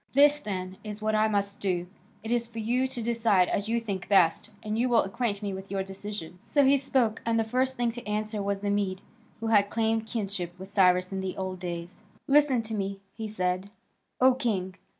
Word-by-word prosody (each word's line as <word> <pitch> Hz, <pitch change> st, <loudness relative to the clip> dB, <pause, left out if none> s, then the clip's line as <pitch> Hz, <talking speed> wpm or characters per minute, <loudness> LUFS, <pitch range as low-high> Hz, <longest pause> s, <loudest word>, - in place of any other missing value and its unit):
This, 290 Hz, +1 st, +6 dB
then, 185 Hz, -6 st, -5 dB
is 210 Hz, -1 st, -6 dB
what 215 Hz, 0 st, 0 dB
I 215 Hz, 0 st, +4 dB
myself -, -, -2 dB
must 200 Hz, 0 st, 0 dB
do; 180 Hz, -3 st, -1 dB, 0.4 s
it 225 Hz, -, -4 dB
is 240 Hz, -1 st, +1 dB
for 230 Hz, 0 st, -12 dB
you 245 Hz, +4 st, +1 dB
to 245 Hz, -3 st, -5 dB
decide 225 Hz, -5 st, +3 dB
as 205 Hz, +2 st, -1 dB
you 235 Hz, +1 st, +2 dB
think 200 Hz, -5 st, -5 dB
best, 190 Hz, 0 st, +4 dB
and 215 Hz, 0 st, -2 dB
you 245 Hz, +3 st, +1 dB
will 235 Hz, -, +4 dB
acquaint 205 Hz, +1 st, -2 dB
me 200 Hz, -1 st, -2 dB
with 190 Hz, +1 st, -7 dB
your 195 Hz, 0 st, -1 dB
decision." 190 Hz, -2 st, -7 dB
So 285 Hz, +4 st, +3 dB
he 275 Hz, +1 st, +5 dB
spoke, 260 Hz, -5 st, +1 dB
and 230 Hz, 0 st, +1 dB
the -, -, +3 dB
first 255 Hz, +3 st, 0 dB
to 240 Hz, -1 st, -2 dB
answer 210 Hz, 0 st, -2 dB
was 200 Hz, 0 st, -1 dB
the 205 Hz, 0 st, 0 dB
Mede 195 Hz, -2 st, -1 dB, 0.4 s
who 225 Hz, -, -2 dB
had 205 Hz, -2 st, +4 dB
claimed 225 Hz, 0 st, 0 dB
kinship 195 Hz, -6 st, -4 dB
with 190 Hz, +1 st, -9 dB
Cyrus 185 Hz, -2 st, +3 dB
in 190 Hz, 0 st, -2 dB
the 190 Hz, -1 st, -4 dB
old 185 Hz, -1 st, -4 dB
days. 175 Hz, 0 st, -6 dB, 0.3 s
"Listen 275 Hz, -4 st, +4 dB
to 220 Hz, 0 st, -5 dB
me," 195 Hz, -1 st, -2 dB
he 220 Hz, -1 st, -5 dB
said, 185 Hz, -1 st, -1 dB, 0.5 s
"O 260 Hz, 0 st, +6 dB
king! 205 Hz, -8 st, -1 dB
210 Hz, 215 wpm, -28 LUFS, 190-230 Hz, 0.5 s, This